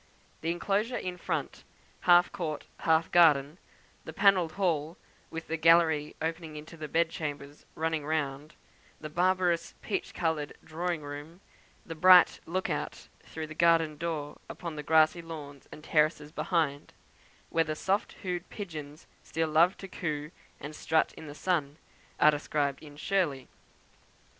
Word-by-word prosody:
The 165 - -2
enclosure 205 +7 0
in 180 -1 -4
front, - - -3 0.5
half 175 0 +7
court, 165 -6 -4
half 160 0 +2
garden; 155 -2 +5 0.4
the - - -7
panelled 185 -5 +3
hall, 165 -4 -1 0.3
with 160 0 -6
the 165 - -3
gallery 160 -2 +4
opening 160 -1 -4
into 150 +2 -9
the 155 -2 -6
bed 165 +2 +1
chambers 145 -2 -6
running 160 -1 -1
round; 145 -1 -3 0.4
the 155 -1 -7
barbarous 180 0 +1
peach 205 - -3
coloured 160 -3 -2
drawing 165 0 -3
room; 145 +4 -8 0.5
the 165 - -6
bright 180 +2 +7
look 185 +3 -1
out - - -4
through 160 -1 -7
the 155 - -9
garden 165 -1 +3
door 155 -2 -4
upon 170 -3 -6
the 150 - -4
grassy 160 +2 +4
lawns 150 -4 -9
and 150 - -11
terraces 150 -1 +1
behind, 155 -4 -1 0.6
where 165 - +3
the 155 -1 -3
soft 195 +6 -1
hued 180 -2 -3
pigeons 155 -7 -8 0.2
still 160 0 -2
love 170 +5 +4
to 195 - -8
coo 155 -4 -4 0.3
and 150 +2 -7
strut 160 +1 +1
in 160 - -10
the 145 - -9
sun, 155 -5 -1 0.4
are 150 - +7
described 145 -1 -1
in 145 -2 -12
"Shirley." 150 -7 -1
160 Hz, 150 wpm, -29 LUFS, 150-170 Hz, 0.6 s, half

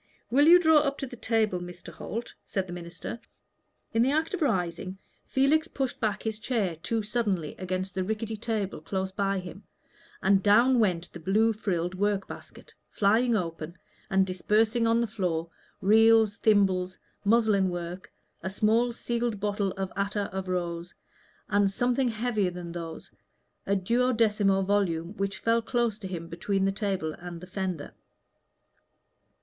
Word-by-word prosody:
"Will 285 +5 +5
you 345 +2 +10
draw 320 -2 +5
up 280 -1 -1
to - - -3
the 245 - -9
table, 220 -5 +1
Mr. 175 0 -9
Holt?" 230 +3 -6
said 190 -2 -1
the 175 - -8
minister. 175 +6 -7 0.7
In 225 - +3
the 250 - +4
act 315 +5 0
of 375 - -3
rising, 185 - -1 0.3
Felix 295 +5 +3
pushed 270 -7 -3
back 215 -4 -1
his 220 -1 -3
chair 220 -8 -1
too 220 +7 -2
suddenly 205 -7 -1
against 185 0 -3
the 190 -1 -1
rickety 220 +2 -3
table 210 -5 -3
close 190 +3 -3
by 195 0 0
him, 185 +1 -7 0.6
and 195 -1 +3
down 235 +6 +5
went 180 -5 0
the 175 - -8
blue 215 +7 +2
frilled 180 -5 -2
work 200 0 0
basket, - - -11 0.2
flying 225 +4 +3
open, 165 -3 -4 0.3
and 190 0 +3
dispersing 220 +5 +1
on 230 +1 +3
the - - +2
floor 175 -6 -2 0.3
reels, 220 +1 +5
thimble, 195 -5 +3 0.3
muslin 210 -3 +3
work, 175 +1 -6 0.3
a 190 - -3
small 220 +5 +2
sealed 235 -2 -2
bottle 205 -1 0
of 190 -1 -4
attar 200 0 -1
of 190 -1 -4
rose, 175 -1 -3 0.5
and 205 -1 +3
something 245 +5 +1
heavier 225 -4 0
than 175 -1 -7
these 165 -1 -7 0.6
a 200 - +2
duodecimo 210 -2 +2
volume 190 -3 0
which 195 -1 -2
fell 230 0 +1
near 240 -1 +3 0.2
him 170 -2 -5
between 190 +4 -1
the 195 - +2
table 195 -6 -2
and 175 -1 -7
the 180 - -9
fender. 185 -5 -4
200 Hz, 155 wpm, -28 LUFS, 185-225 Hz, 0.7 s, you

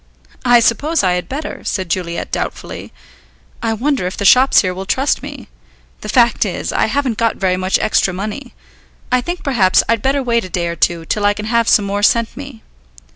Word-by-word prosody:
"I 240 -1 +5
suppose 290 +8 +1
I 185 - +2
had 180 0 -3
better," 295 +4 -6
said 190 -2 -3
Juliet 170 0 -3
doubtfully. - - -5 0.7
"I 225 -1 0
wonder 255 -3 -1
if 185 - -6
the 200 - -3
shops 255 +6 +6
here 185 -2 -2
will 190 +1 -7
trust 270 +6 0
me. - - -9 0.5
The - - -8
fact - - +3
is, - - -4
I - - +1
haven't 260 -2 -1
got 230 -1 +1
very 185 -2 0
much 185 +1 0
extra 215 -3 +1
money. 215 +8 -6 0.6
I 250 0 +3
think 350 +7 -5
perhaps 215 -10 +3
I'd 230 -2 +1
better 270 +2 0
wait 235 -2 +1
a 185 - -8
day 175 -1 -2
or 170 0 -3
two 170 +1 0
till 210 +5 -2
I 205 0 +3
can 210 - -6
have 230 0 +1
some 205 - +4
more 200 +1 -2
sent 230 +2 +2
me." 275 -5 -10
220 Hz, 205 wpm, -17 LUFS, 185-255 Hz, 0.7 s, shops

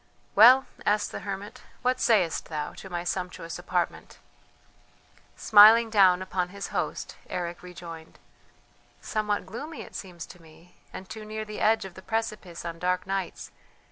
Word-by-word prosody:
"Well," 250 +6 +8 0.2
asked 210 0 +1
the - - -5
hermit, 205 +4 -7 0.2
"what 255 0 +1
sayest 200 -10 +2
thou 150 -2 -4
to 190 - -10
my 175 -1 -3
sumptuous 180 -2 -4
apartment?" 175 0 -3 1.2
Smiling 220 +2 +7
down 185 -3 +5
upon 185 -1 -2
his 200 +1 -7
host - - -3
Eric 175 -1 -4
rejoined: 170 -2 -10 0.8
"Somewhat 210 -1 -2
gloomy 290 +10 -7
it - - -14
seems 180 -3 -7
to 180 - -15
me 165 +2 -19 0.2
and 190 - -9
too 220 +2 -8
near 215 0 -5
the 215 0 -7
edge 220 -1 +3
of 190 - -9
the 185 - -12
precipice 215 -6 -4
on 165 0 -5
dark 180 +1 0
nights. 195 -2 -4
190 Hz, 150 wpm, -27 LUFS, 175-215 Hz, 1.2 s, Well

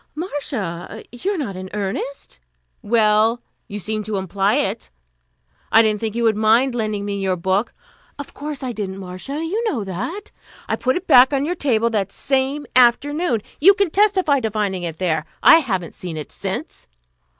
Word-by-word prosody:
"Marcia! 225 - -5
You 365 - -2
are - - -4
not 235 - -4
in 185 0 -7
earnest?" 205 - -5 0.4
"Well, 220 +1 +3 0.3
you 205 - -6
seemed 215 +1 -3
to 210 -1 -2
imply 195 +2 0
it. - - -2 0.8
I 225 - +7
didn't 215 -1 +1
think 220 0 -3
you 235 - 0
would 225 -2 +3
mind 225 +5 +3
lending 215 -3 -2
me 200 -1 -3
your 190 -1 0
book 190 +5 0 0.2
" - - -33
"Of 285 - -8
course 290 -1 -6
I 255 - -2
didn't, 200 -4 -5
Marcia. 195 - -5
You 415 +8 -2
know 230 - -2
that." 250 - -5 0.4
"I - - 0
put 255 +1 0
it 365 - -6
back 260 -3 +6
on 275 0 +1
your 345 - -1
table 235 -8 +1
that 200 -3 -1
same 275 +4 -1
afternoon. 255 - +3 0.2
You 390 +6 +7
can 400 -4 +1
testify 375 -8 +3
to 225 -3 -1
finding 205 -3 -2
it 165 -2 -5
there. 160 -4 0 0.2
I 325 - +9
haven't 190 - -2
seen 175 -3 -7
it 150 - -7
since." - - -6
225 Hz, 185 wpm, -20 LUFS, 195-280 Hz, 0.8 s, I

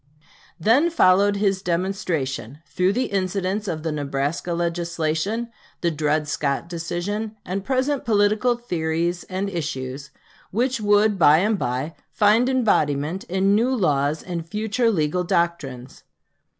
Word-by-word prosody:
Then 255 - +4
followed 200 - +4
his 195 -2 +1
demonstration, 170 - -2
through 185 +2 +1
the 255 +4 0
incidents 195 +1 -1
of 155 -4 -3
the 160 - -1
Nebraska 145 +3 -2
legislation, 170 +6 -2 0.3
the 170 - +1
Dred 150 0 0
Scott 140 +1 -1
decision, 175 +6 -4
and 190 +2 -3
present 265 +3 0
political 215 +2 +2
theories 170 -5 -2
and 190 +2 -3
issues, 140 -6 -4 0.4
which 245 +3 0
would 205 -1 +3
by 155 -2 +7
and 205 +3 +1
by 130 +6 -2 0.2
find 215 +4 +3
embodiment 170 - +1
in 190 +2 +1
new 230 +5 +3
laws 150 - +1
and 175 -2 -4
future 220 +5 0
legal 180 -2 0
doctrines. 155 -8 -2
180 Hz, 125 wpm, -23 LUFS, 155-210 Hz, 0.4 s, by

